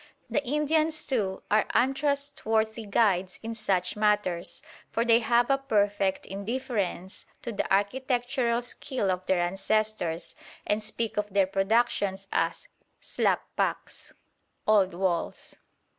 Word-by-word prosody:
The 290 - +1
Indians, 310 +3 +1
too, 205 -8 -1
are 215 +1 +4
untrustworthy 265 -5 0
guides 195 -3 +2
in 225 +1 -4
such 190 -5 0
matters, 210 -5 0 0.3
for 230 - 0
they 230 -1 +6
have 240 +2 +2
a 275 - +3
perfect 205 -6 +1
indifference 200 -2 -3 0.2
to 235 - -3
the 205 - -3
architectural 245 +3 +1
skill 245 -4 -2
of 180 0 -2
their 190 -2 +3
ancestors, 195 -1 -1 0.3
and 210 +1 +1
speak 220 +1 -3
of 210 0 -1
their 195 0 +4
productions 195 0 +1
as - - -1 0.3
"xlap - - +1
pak" - - -1 0.7
(old 195 -4 +4
walls). 180 -2 -2
215 Hz, 120 wpm, -28 LUFS, 195-245 Hz, 0.7 s, they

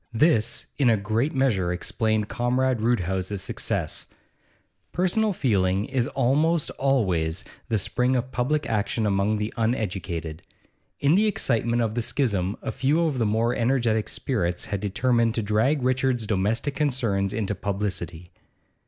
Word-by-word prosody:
This, 115 -4 +2
in 130 -4 +4
a 110 - +4
great 110 +8 -1
measure, 105 -10 +1
explained 110 +4 -1
Comrade 125 0 0
Roodhouse's 95 -4 -1
success; - - -3 0.8
personal 195 +5 +1
feeling 100 - +1
is 130 -3 -1
almost 150 +5 +1
always 95 -11 0 0.3
the 110 - +2
spring 125 +6 0
of 125 +1 -2
public 145 +4 0
action 110 +1 0
among 100 +1 +1
the 105 +1 -3
uneducated. 95 -8 -2 0.6
In 140 +2 +3
the 210 +4 +4
excitement 120 - +1
of 110 -1 -1
the 120 - -1
schism 105 -7 0
a - - -2
few 150 +6 +1
of 145 -5 -1
the 115 - +2
more 115 +3 +1
energetic 115 -3 +1
spirits 90 -9 -2
had 100 - -3
determined 115 +3 +1
to 115 - -1
drag 115 +7 +1
Richard's 130 -2 +1
domestic 110 +7 0
concerns 115 -10 0
into 105 -2 -2
publicity. 95 -4 -4
115 Hz, 140 wpm, -25 LUFS, 100-130 Hz, 0.8 s, in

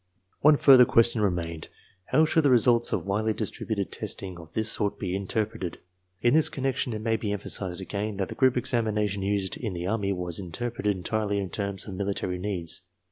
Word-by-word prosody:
One 150 0 +6
further 135 -3 +8
question 115 -1 +3
remained. 85 -5 -2 0.4
How 155 - +3
should 160 +1 +3
the 145 - +3
results 120 -1 +4
of - - -1
widely 110 +3 0
distributed 105 -1 -3
testing 90 -2 -5
of 80 -2 -13
this 110 0 +2
sort 100 -1 -1
be 95 -1 -3
interpreted? 100 -1 -3 0.5
In 120 - +4
this 155 0 +5
^ - - -21
connection 130 -2 -1
it 110 - -4
may 115 -1 +1
be 105 -2 -3
emphasized 95 -2 -3
aga^in 100 +2 -4
that 95 -2 -1
the - - -5
group 130 -1 +3
examina 110 -4 0
tion 100 0 -4
used 100 -1 -1
in 110 -6 -4
the 85 0 -4
Army 100 0 0
was 90 -2 -2
interpreted 105 +3 -2
entirely 105 +2 -1
in 95 -2 -3
terms 100 -2 -3
of 100 - -6
military 95 -2 -2
needs. 90 -5 -3
105 Hz, 195 wpm, -27 LUFS, 95-115 Hz, 0.5 s, further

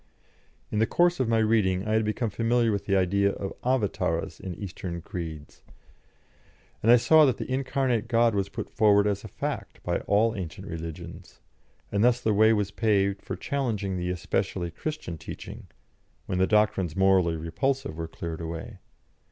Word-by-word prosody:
In 105 - 0
the 110 - +3
course 175 -1 +2
of 130 - +1
my 115 - +3
reading 105 -3 +2
I - - -1
had 110 0 +3
become 110 +1 -1
familiar 115 +1 +2
with 100 -1 -2
the 100 - +2
idea 100 +2 +2
of 100 - -5
Avatâras 105 -9 -1
in 95 -3 -6
Eastern 90 -2 -6
creeds, 80 -3 -7 1.2
and 115 - +4
I - - +10
saw 155 +6 +6
that 130 - +1
the - - -5
incarnate 130 -4 0
God 115 -1 +3
was 100 -1 -1
put - - -5
forward 105 -1 +4
as 100 -1 -1
a - - -7
fact - - -5
by - - 0
all 110 +2 +3
ancient 95 0 -6
religions, 80 -4 -8 0.5
and 100 +1 +1
thus 120 0 +4
the 110 -3 +1
way 110 +2 +5
was 105 -3 +1
paved 100 -3 +1
for - - -5
challenging 115 -9 -2
the 90 0 -2
especially 90 0 -2
Christian 120 - -5
teaching, - - -9 0.6
when 90 - -2
the 95 - +3
doctrines 105 -6 +2
morally 95 -3 +3
repulsive 130 - -2
were 80 0 -4
cleared 80 0 -6
away. 80 0 -6
100 Hz, 170 wpm, -27 LUFS, 90-115 Hz, 1.2 s, I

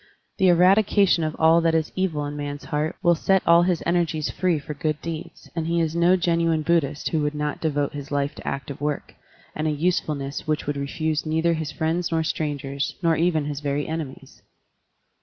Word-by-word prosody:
The 190 - +4
eradication 185 0 +4
of 155 0 -2
all 160 +1 +5
that 165 -1 +2
is 160 -1 0
evil 165 -6 -1
in 145 0 -5
man's 145 0 -5
heart 155 +2 -2
will 175 - +5
set 190 +3 +2
all 170 +1 +6
his 175 -2 +1
energies 170 -3 0
free 180 -3 +1
for 150 +1 -6
good 150 +1 -2
deeds, 165 -2 -7
and 165 -1 -2
he 170 0 +1
is 165 -1 0
no 170 +2 +4
genuine 165 -3 +1
Buddhist 150 -3 0
who 160 - 0
would 150 0 -1
not 150 0 -3
devote 145 -3 0
his 145 -1 -7
life 145 0 -1
to - - -11
active 140 0 -4
work, 150 0 -3 0.4
and 155 +1 -1
a - - +2
usefulness 150 -3 -2
which 155 -1 -1
would 145 - -2
refuse 155 +2 -2
neither 160 +2 +1
his 160 -2 -3
friends 165 +3 -1
nor 160 -1 +1
strangers, 140 -3 -3
nor 165 -1 +3
even 160 -3 +1
his 145 -1 -4
very 145 0 -2
enemies. 155 -4 -6
155 Hz, 195 wpm, -24 LUFS, 145-170 Hz, 0.4 s, all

